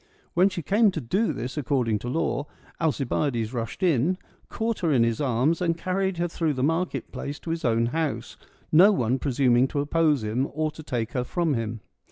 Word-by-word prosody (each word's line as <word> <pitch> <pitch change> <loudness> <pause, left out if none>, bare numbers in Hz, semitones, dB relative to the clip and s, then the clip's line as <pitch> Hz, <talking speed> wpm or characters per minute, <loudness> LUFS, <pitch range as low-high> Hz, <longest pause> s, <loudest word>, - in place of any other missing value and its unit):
When 185 +3 +4
she 175 -4 -5
came 210 +7 +4
to 160 - -2
do 190 - 0
this 130 +5 -4
according 125 -6 0
to 120 - -5
law, 145 -1 -1 0.3
Alcibiades 135 -6 0
rushed 115 - -4
in, 170 +1 +2 0.3
caught 225 0 -2
her 165 -3 +1
in 125 -5 +4
his 115 +1 0
arms, 135 +5 +1
and 165 -2 +1
carried 190 +1 -1
her 175 +1 0
through 165 -2 -1
the 130 - -1
market 165 +5 -1
place 145 +1 -5
to 165 - -4
his 165 0 -3
own 115 -1 +2
house, 155 +4 -2 0.4
no 185 +7 +7
one 130 - +1
presuming 130 -2 +3
to 145 - -3
oppose 150 -3 +2
him, 115 +6 0
or 155 +1 -1
to 155 - -10
take 120 -6 -3
her 125 - -1
from 165 +4 0
him. 115 -2 -3
145 Hz, 200 wpm, -26 LUFS, 120-170 Hz, 0.4 s, no